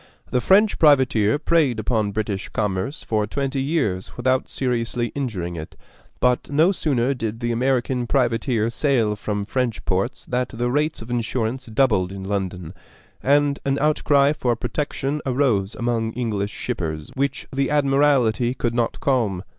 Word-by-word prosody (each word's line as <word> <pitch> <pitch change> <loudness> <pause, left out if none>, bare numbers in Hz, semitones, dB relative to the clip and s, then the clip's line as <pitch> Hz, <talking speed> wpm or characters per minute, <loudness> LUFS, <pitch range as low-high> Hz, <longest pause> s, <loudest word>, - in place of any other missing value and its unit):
The 125 - +1
French 200 - +4
privateer 130 -7 +4
preyed 150 -6 +2
upon 110 -2 0
British 100 -1 -3
commerce 105 +6 -2
for 105 -2 0
twenty 135 +3 -2
years 135 - -1
without 130 +1 +1
seriously 120 -2 -1
injuring 100 -11 -3
it; 80 -1 -8 0.4
but 125 0 +1
no 155 +6 +4
sooner 140 -8 0
did 115 -3 -4
the 120 -1 -1
American 125 0 0
privateer 115 -3 +1
sail 120 -6 +1
from 105 0 -3
French 120 +1 -2
ports 95 +6 -1
than 125 0 -1
the 120 +1 -2
rates 150 -1 0
of 115 - -10
insurance 120 +1 -2
doubled 110 -6 +2
in 95 0 -7
London, 95 -4 -3 0.5
and 145 +1 +2
an 135 0 0
outcry 145 -1 +3
for 125 -5 0
protection 140 +4 -3
arose 125 -7 +1
among 115 -1 -1
English 110 -4 -2
shippers 80 -6 -4
which 140 0 -2
the 135 0 0
Admiralty 135 -4 +2
could 120 -2 -1
not 120 -1 -1
calm. 110 -9 0
120 Hz, 145 wpm, -22 LUFS, 110-135 Hz, 0.5 s, French